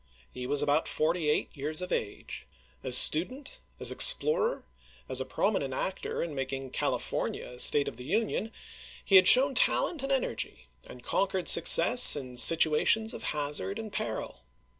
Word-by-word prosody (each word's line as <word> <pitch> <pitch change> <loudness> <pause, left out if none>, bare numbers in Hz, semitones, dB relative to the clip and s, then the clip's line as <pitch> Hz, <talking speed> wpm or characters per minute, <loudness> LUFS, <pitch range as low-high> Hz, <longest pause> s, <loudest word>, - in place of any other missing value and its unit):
He 125 0 -8
was 145 +1 0
about 145 +2 -1
forty 160 0 -3
eight 150 - -3
years 150 +2 -3
of 180 0 -4
age. 100 - -7 0.4
As 125 -1 +5
student, 260 - +3 0.2
as - - 0
explorer, 475 -1 +1 0.4
as - - -1
a - - -6
prominent - - -4
actor - - -6
in 165 -3 -8
making 135 -1 -7
Cali - - -3
fornia - - -7
a 125 - -12
State 145 +2 +4
of - - -9
the 125 - -10
Union, 220 - -4 0.5
he 195 - +4
had 185 - +4
shown 270 +2 +6
talent 285 +4 -1
and 275 0 -6
energy, 115 - -5 0.2
and 125 -1 -15
conquered 190 -2 -3
success 240 +9 +6
in 130 -3 -9
situations 165 - +2
of - - -9
hazard 150 +7 -4
and 220 -2 -10
peril. 110 - -7
165 Hz, 160 wpm, -26 LUFS, -, 0.5 s, shown